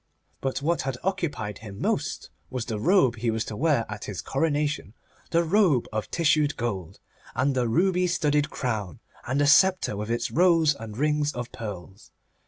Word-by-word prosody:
But 135 Hz, +1 st, -2 dB
what 170 Hz, +3 st, +1 dB
had 135 Hz, -1 st, -3 dB
occupied 145 Hz, -, -2 dB
him 100 Hz, -2 st, -9 dB
most -, -, -2 dB, 0.2 s
was 125 Hz, -3 st, -3 dB
the 110 Hz, -3 st, -3 dB
robe 160 Hz, -, +3 dB
he 115 Hz, +1 st, -1 dB
was 110 Hz, 0 st, -1 dB
to 110 Hz, -, -6 dB
wear 140 Hz, -3 st, +2 dB
at 105 Hz, -1 st, -6 dB
his 100 Hz, -4 st, -5 dB
coronation, 145 Hz, -5 st, -1 dB, 0.3 s
the 170 Hz, 0 st, +3 dB
robe 170 Hz, -, +3 dB
of 110 Hz, -1 st, -3 dB
tissued 155 Hz, -3 st, +2 dB
gold, 100 Hz, -8 st, -4 dB, 0.4 s
and 135 Hz, +3 st, +1 dB
the 125 Hz, -2 st, +1 dB
ruby 180 Hz, +7 st, +2 dB
studded 150 Hz, -3 st, +1 dB
crown, 105 Hz, -, -3 dB, 0.3 s
and 130 Hz, +3 st, 0 dB
the 145 Hz, -, +3 dB
sceptre 185 Hz, -, +4 dB
with 105 Hz, +2 st, -4 dB
its 120 Hz, 0 st, -1 dB
rows 165 Hz, -3 st, +4 dB
and 115 Hz, -5 st, -9 dB
rings 150 Hz, +1 st, +1 dB
of 125 Hz, 0 st, -5 dB
pearls. 100 Hz, -1 st, -8 dB
135 Hz, 175 wpm, -26 LUFS, 110-155 Hz, 0.4 s, sceptre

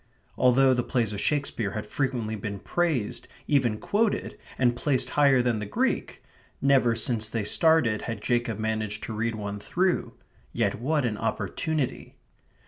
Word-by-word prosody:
Although 130 Hz, +1 st, +4 dB
the 125 Hz, -, +1 dB
plays 120 Hz, -4 st, -1 dB
of 100 Hz, -, -3 dB
Shakespeare 140 Hz, -8 st, -1 dB
had 105 Hz, -1 st, -4 dB
frequently 120 Hz, -3 st, -2 dB
been 100 Hz, -1 st, -5 dB
praised, 150 Hz, -, -1 dB, 0.2 s
even 130 Hz, -7 st, +2 dB
quoted, 210 Hz, -, 0 dB, 0.2 s
and 120 Hz, -2 st, +2 dB
placed 130 Hz, +1 st, 0 dB
higher 140 Hz, -4 st, +4 dB
than 120 Hz, -3 st, +1 dB
the 105 Hz, -, -5 dB
Greek, -, -, -1 dB, 0.4 s
never 135 Hz, -4 st, +3 dB
since 110 Hz, -1 st, -1 dB
they 115 Hz, -2 st, -2 dB
started 125 Hz, -, +3 dB
had 115 Hz, -2 st, -3 dB
Jacob 120 Hz, -1 st, 0 dB
managed 110 Hz, -1 st, -2 dB
to 115 Hz, -, -5 dB
read 115 Hz, +1 st, -1 dB
one 105 Hz, -1 st, -5 dB
through. 180 Hz, -, 0 dB, 0.4 s
Yet -, -, 0 dB
what 150 Hz, +1 st, +1 dB
an 110 Hz, -3 st, -2 dB
opportunity! 155 Hz, -5 st, -2 dB
120 Hz, 150 wpm, -26 LUFS, 110-140 Hz, 0.4 s, Although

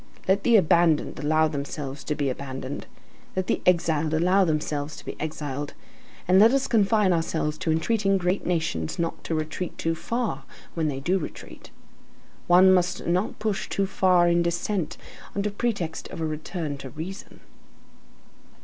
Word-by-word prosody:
Let 195 Hz, +2 st, +3 dB
the 235 Hz, +1 st, +4 dB
abandoned 170 Hz, -6 st, +3 dB
allow 155 Hz, +2 st, +3 dB
themselves 140 Hz, -1 st, -5 dB
to 150 Hz, -, -1 dB
be 140 Hz, -3 st, 0 dB
abandoned, 130 Hz, +1 st, -6 dB, 0.5 s
let 185 Hz, 0 st, 0 dB
the -, -, 0 dB
exiled 160 Hz, -3 st, +2 dB
allow 180 Hz, +4 st, +4 dB
themselves 150 Hz, -2 st, -1 dB
to -, -, -12 dB
be -, -, -5 dB
exiled, 145 Hz, -2 st, -4 dB, 0.5 s
and 185 Hz, +1 st, +6 dB
let 225 Hz, +4 st, +7 dB
us 275 Hz, -1 st, +2 dB
confine 210 Hz, -3 st, +3 dB
ourselves 165 Hz, -2 st, -1 dB
to 160 Hz, -, 0 dB
entreating 195 Hz, +4 st, +2 dB
great 180 Hz, +1 st, 0 dB
nations 155 Hz, -, -1 dB
not 165 Hz, -1 st, -3 dB
to 165 Hz, -, -1 dB
retreat 155 Hz, +3 st, -4 dB
too 165 Hz, -, 0 dB
far, 215 Hz, -, -3 dB, 0.3 s
when 160 Hz, -2 st, 0 dB
they 135 Hz, -3 st, -2 dB
do 185 Hz, +6 st, +1 dB
retreat. 155 Hz, -, -9 dB, 0.8 s
One 185 Hz, +2 st, +7 dB
must 180 Hz, -1 st, +1 dB
not 180 Hz, +4 st, 0 dB
push 210 Hz, -3 st, -2 dB
too 200 Hz, -, 0 dB
far 185 Hz, -2 st, +3 dB
in 170 Hz, 0 st, +3 dB
descent 170 Hz, +1 st, -1 dB, 0.4 s
under 200 Hz, +1 st, -1 dB
pretext 200 Hz, -7 st, -2 dB
of -, -, -8 dB
a 160 Hz, -, -1 dB
return 155 Hz, -1 st, -4 dB
to 135 Hz, -, -7 dB
reason. 165 Hz, +9 st, -8 dB
170 Hz, 160 wpm, -25 LUFS, 150-190 Hz, 0.8 s, let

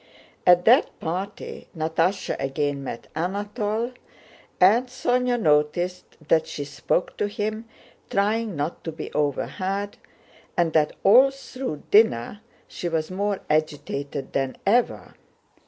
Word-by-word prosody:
At 180 Hz, 0 st, +6 dB
that 250 Hz, +7 st, +4 dB
party 185 Hz, +5 st, -5 dB
Natásha 165 Hz, +4 st, 0 dB
again 140 Hz, +1 st, -1 dB
met 120 Hz, -, -6 dB
Anatole, 205 Hz, +6 st, -2 dB, 0.7 s
and 225 Hz, +8 st, +5 dB
Sónya 250 Hz, -1 st, 0 dB
noticed 160 Hz, +2 st, +1 dB
that 160 Hz, 0 st, +3 dB
she 145 Hz, -, -5 dB
spoke 145 Hz, +5 st, -1 dB
to 205 Hz, -, 0 dB
him, 215 Hz, +1 st, -3 dB, 0.4 s
trying 210 Hz, 0 st, 0 dB
not 145 Hz, +3 st, -3 dB
to 165 Hz, -, -4 dB
be 155 Hz, -, -7 dB
overheard, 190 Hz, +7 st, -2 dB, 0.6 s
and 170 Hz, -2 st, +2 dB
that 150 Hz, -2 st, +3 dB
all 250 Hz, +7 st, +7 dB
through 265 Hz, -, -6 dB
dinner 205 Hz, -, +4 dB, 0.3 s
she 175 Hz, -, -4 dB
was 160 Hz, 0 st, -2 dB
more 200 Hz, +1 st, -1 dB
agitated 145 Hz, -2 st, -2 dB
than 135 Hz, -1 st, -1 dB
ever. 235 Hz, +5 st, +1 dB
185 Hz, 120 wpm, -24 LUFS, 155-215 Hz, 0.7 s, all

